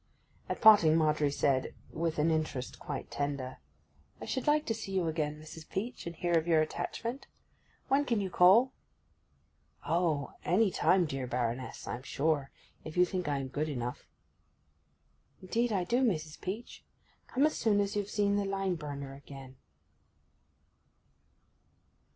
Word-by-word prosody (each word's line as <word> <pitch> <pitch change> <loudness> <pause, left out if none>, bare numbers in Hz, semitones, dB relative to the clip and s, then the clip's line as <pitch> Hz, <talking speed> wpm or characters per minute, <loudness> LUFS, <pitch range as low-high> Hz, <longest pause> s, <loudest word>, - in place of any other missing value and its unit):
At - - -3
parting 195 -8 +8
Margery 150 -2 +2
said, 135 -2 0 0.2
with 165 0 -2
an 155 +2 +3
interest 150 -5 -2
quite - - -6
tender, 140 -3 -3 0.6
'I - - -7
should 260 - -3
like 300 +1 +3
to 225 - 0
see 220 -3 -6
you 185 -2 +1
again, 150 -2 -2
Mrs. 155 0 -11
Peach, 225 0 -4
and 170 - -6
hear 175 +1 0
of 160 - -7
your 165 -2 +4
attachment. 230 - -3 0.6
When 280 +2 +3
can 235 -5 +1
you 190 -2 -3
call?' 205 +10 +6 1.1
'Oh—any 170 +5 +1
time, 185 0 +3
dear 135 -4 -4
Baroness, 125 +1 -3
I'm 120 - -4
sure—if 150 +3 -3
you 180 - +6
think 180 -1 -3
I 145 -1 0
am 135 -1 -4
good 150 +4 -2
enough.' 125 -3 -4 1.3
'Indeed, 230 +6 0
I 190 -4 +1
do, 240 +8 +1
Mrs. 160 -9 -1
Peach. 210 +6 -6 0.4
Come 270 +3 +2
as 310 - +1
soon 210 -3 +2
as 200 0 0
you've 205 -1 -1
seen 205 -1 +1
the 200 - 0
lime 195 -1 -1
burner 140 -3 -6
again. 135 -1 -11
165 Hz, 145 wpm, -31 LUFS, 145-205 Hz, 1.3 s, parting